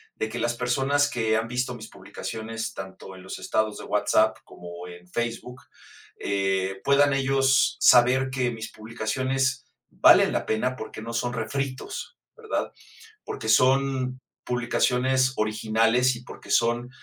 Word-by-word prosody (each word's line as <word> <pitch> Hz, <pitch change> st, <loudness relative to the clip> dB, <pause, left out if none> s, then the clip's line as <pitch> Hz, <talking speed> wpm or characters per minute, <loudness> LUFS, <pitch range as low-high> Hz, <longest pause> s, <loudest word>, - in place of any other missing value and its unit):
de, 110 Hz, -, -3 dB
que 120 Hz, -, -6 dB
las 120 Hz, 0 st, 0 dB
personas 135 Hz, +4 st, +1 dB
que 110 Hz, -4 st, 0 dB
han 115 Hz, 0 st, -2 dB
visto 125 Hz, +1 st, -2 dB
mis 110 Hz, -2 st, -10 dB
publicaciones, 115 Hz, 0 st, -6 dB
tanto 95 Hz, 0 st, -9 dB
en 95 Hz, -, -13 dB
los 95 Hz, -, -7 dB
estados 110 Hz, -1 st, -1 dB
de -, -, -8 dB
WhatsApp -, -, +2 dB
como 85 Hz, 0 st, -10 dB
en 90 Hz, 0 st, -12 dB
Facebook, 120 Hz, +3 st, -4 dB, 0.6 s
eh, 95 Hz, -1 st, -1 dB
puedan 140 Hz, 0 st, +4 dB
ellos 135 Hz, 0 st, +2 dB
saber 130 Hz, +2 st, +5 dB
que 130 Hz, -2 st, -1 dB
mis 110 Hz, -1 st, -7 dB
publicaciones 130 Hz, +4 st, -2 dB, 0.2 s
valen -, -, +6 dB
la -, -, -1 dB
pena 125 Hz, +4 st, 0 dB
porque 110 Hz, -2 st, -8 dB
no 115 Hz, +1 st, -6 dB
son 120 Hz, +1 st, -1 dB
refritos, 130 Hz, +3 st, -4 dB, 0.2 s
¿verdad? -, -, -3 dB, 0.5 s
Porque 110 Hz, -, -6 dB
son 130 Hz, 0 st, +2 dB, 0.2 s
publicaciones 125 Hz, +2 st, +1 dB
originales 115 Hz, +3 st, +2 dB
y 125 Hz, -, -13 dB
porque -, -, -11 dB
son, 120 Hz, +1 st, +2 dB
120 Hz, 140 wpm, -25 LUFS, 110-130 Hz, 0.6 s, valen